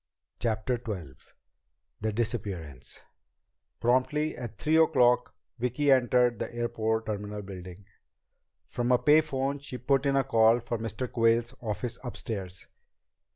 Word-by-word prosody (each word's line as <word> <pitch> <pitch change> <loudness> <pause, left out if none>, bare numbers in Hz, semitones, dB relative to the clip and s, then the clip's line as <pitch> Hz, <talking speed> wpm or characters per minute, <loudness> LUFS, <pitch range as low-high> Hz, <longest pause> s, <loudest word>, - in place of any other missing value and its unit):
CHAPTER 115 +2 -1
XII 90 - -5 0.9
The 110 +1 0
Disappearance 100 - -4 0.8
Promptly 130 +6 +1
at 120 -4 -7
three 155 +8 +2
o'clock 125 -7 +4 0.2
Vicki 125 +4 +1
entered 125 -3 +3
the - - -4
airport 115 -1 -1
terminal 105 -1 -4
building. 95 0 -10 0.8
From 120 0 -2
a 125 - +6
pay 150 +4 +5
phone 140 -2 -2
she 135 -2 -7
put 135 +2 +1
in 140 - +2
a 135 - +3
call 115 0 +4
for 120 -1 -4
Mr. 115 +3 -4
Quayle's 115 +1 +2
office 115 +1 -3
upstairs. 100 -7 -5
120 Hz, 125 wpm, -28 LUFS, 110-130 Hz, 0.9 s, a